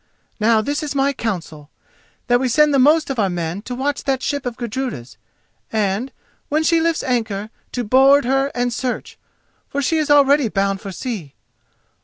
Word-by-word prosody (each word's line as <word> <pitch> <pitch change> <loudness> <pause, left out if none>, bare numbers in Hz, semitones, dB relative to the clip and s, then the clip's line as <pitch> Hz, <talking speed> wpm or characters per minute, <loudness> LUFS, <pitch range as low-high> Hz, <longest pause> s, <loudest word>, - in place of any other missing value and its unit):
Now 220 0 +3
this 290 +7 -2
is 295 -2 -4
my 280 +1 +2
counsel: 165 - -5 0.6
that 245 0 +3
we 260 - 0
send 300 +4 +3
the 275 - +4
most 300 +3 +4
of 260 - -3
our 200 -3 +2
men 175 +1 -3
to 245 +3 -6
watch 280 +3 -2
that 265 -1 0
ship 285 -3 -2
of 240 - -5
Gudruda's, 235 - -5 0.6
and, 215 +3 -1 0.4
when 310 +1 +1
she 330 +1 +3
lifts 330 0 0
anchor, 220 -5 -2 0.2
to 245 - -2
board 265 +4 +5
her 270 +2 +1
and 245 0 0
search, 250 0 -4 0.5
for 280 - -3
she 315 +3 +1
is 305 - -1
already 285 -3 +5
bound 195 -1 -1
for 195 - -6
sea. 185 - -6
250 Hz, 180 wpm, -20 LUFS, 210-280 Hz, 0.6 s, board